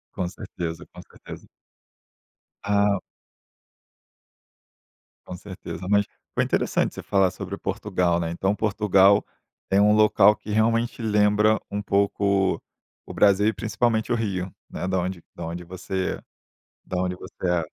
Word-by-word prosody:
Com 90 Hz, -, -1 dB
certeza, 85 Hz, -2 st, -6 dB
com -, -, -10 dB
certeza. -, -, -12 dB, 1.2 s
Ah. 100 Hz, -1 st, +2 dB, 2.3 s
Com 90 Hz, -, -6 dB
certeza. 90 Hz, -2 st, -8 dB
Mas 100 Hz, 0 st, +4 dB, 0.3 s
foi -, -, +3 dB
interessante -, -, 0 dB
você -, -, -7 dB
falar 95 Hz, -3 st, +2 dB
sobre -, -, -6 dB
Portugal, 85 Hz, -1 st, -1 dB
né. 85 Hz, -1 st, -2 dB
Então, 95 Hz, +4 st, 0 dB
Portugal 100 Hz, -2 st, +3 dB, 0.4 s
tem 95 Hz, -, +2 dB
um 105 Hz, 0 st, +5 dB
local 105 Hz, 0 st, +5 dB
que 105 Hz, -, -9 dB
realmente 115 Hz, +3 st, +1 dB
lembra 105 Hz, 0 st, +3 dB
um 100 Hz, 0 st, -2 dB
pouco 100 Hz, -1 st, +1 dB, 0.5 s
o -, -, -7 dB
Brasil 100 Hz, 0 st, +4 dB
e 110 Hz, -, +2 dB
principalmente 110 Hz, +2 st, 0 dB
o -, -, +3 dB
Rio, 95 Hz, -5 st, -3 dB, 0.2 s
né, -, -, -4 dB
da 95 Hz, -1 st, 0 dB
onde 90 Hz, -1 st, -4 dB
da -, -, -6 dB
onde 85 Hz, +2 st, -5 dB
você 95 Hz, +1 st, -4 dB, 0.7 s
da 90 Hz, -, -4 dB
onde 90 Hz, 0 st, -1 dB
você 90 Hz, -, -6 dB
é, 90 Hz, -1 st, +2 dB
100 Hz, 140 wpm, -24 LUFS, 90-105 Hz, 2.3 s, um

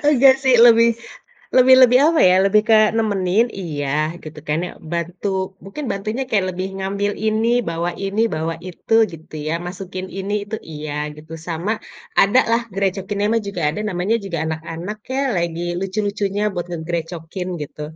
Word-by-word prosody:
Nggak 265 Hz, +1 st, +7 dB
sih, 260 Hz, -2 st, +5 dB
lebih, 230 Hz, 0 st, +7 dB, 0.7 s
lebih 260 Hz, 0 st, +8 dB
lebih 250 Hz, 0 st, +7 dB
apa 330 Hz, -1 st, +3 dB
ya, 180 Hz, -, +5 dB
lebih 210 Hz, +2 st, +4 dB
kayak 215 Hz, -1 st, +6 dB
nemenin 205 Hz, 0 st, +2 dB, 0.2 s
iya, 145 Hz, -4 st, -3 dB, 0.4 s
gitu 155 Hz, -1 st, -9 dB
kan 150 Hz, +2 st, 0 dB
ya, -, -, -8 dB, 0.2 s
bantu 170 Hz, +3 st, -3 dB, 0.4 s
mungkin 200 Hz, +10 st, -7 dB
bantunya 215 Hz, +6 st, -3 dB
kayak 200 Hz, -5 st, +2 dB
lebih 185 Hz, +1 st, -3 dB
ngambil 200 Hz, +1 st, -1 dB, 0.2 s
ini, 220 Hz, +1 st, +1 dB, 0.2 s
bawa 170 Hz, +1 st, -1 dB, 0.2 s
ini, 200 Hz, +3 st, 0 dB
bawa 165 Hz, +1 st, -2 dB
itu 180 Hz, -, -5 dB, 0.2 s
gitu 160 Hz, -1 st, -12 dB
ya, 160 Hz, -, 0 dB
masukin 185 Hz, 0 st, -6 dB
ini, 200 Hz, +2 st, -3 dB
itu, 210 Hz, +2 st, -5 dB, 0.2 s
iya 150 Hz, 0 st, -5 dB, 0.2 s
gitu, 155 Hz, +2 st, -12 dB
sama 170 Hz, +5 st, -2 dB, 0.5 s
adalah 230 Hz, +2 st, +3 dB, 0.2 s
grecokinnya 195 Hz, +1 st, -1 dB
mah 230 Hz, -, +2 dB
juga 180 Hz, -4 st, -4 dB
ada, 160 Hz, -, -4 dB
namanya 185 Hz, +5 st, 0 dB
juga 170 Hz, -3 st, -3 dB
anak-anak 165 Hz, +6 st, -5 dB, 0.2 s
ya, 270 Hz, -, 0 dB, 0.2 s
lagi 170 Hz, 0 st, -2 dB, 0.2 s
lucu-lucunya 200 Hz, +1 st, -2 dB
buat 175 Hz, -1 st, -3 dB
ngegrecokin 170 Hz, +1 st, -4 dB, 0.2 s
gitu. 150 Hz, -, -10 dB
195 Hz, 155 wpm, -20 LUFS, 170-215 Hz, 0.7 s, lebih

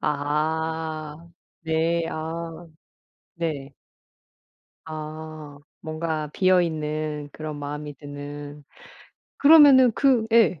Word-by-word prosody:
아. 155 Hz, +2 st, -2 dB, 0.3 s
네 165 Hz, +1 st, 0 dB
아. 165 Hz, +1 st, -6 dB, 0.7 s
네. 150 Hz, -5 st, -4 dB, 1.1 s
아. 155 Hz, -1 st, -8 dB, 0.2 s
뭔가 155 Hz, -1 st, -3 dB
비어 185 Hz, +1 st, +4 dB
있는 155 Hz, -2 st, -3 dB
그런 155 Hz, -1 st, -6 dB
마음이 145 Hz, +1 st, -6 dB
드는. 145 Hz, +1 st, -9 dB, 0.7 s
그러면은 280 Hz, -5 st, +7 dB
그 250 Hz, -3 st, +3 dB
예. 205 Hz, -8 st, +4 dB
155 Hz, 135 characters per minute, -24 LUFS, 150-165 Hz, 1.1 s, 그러면은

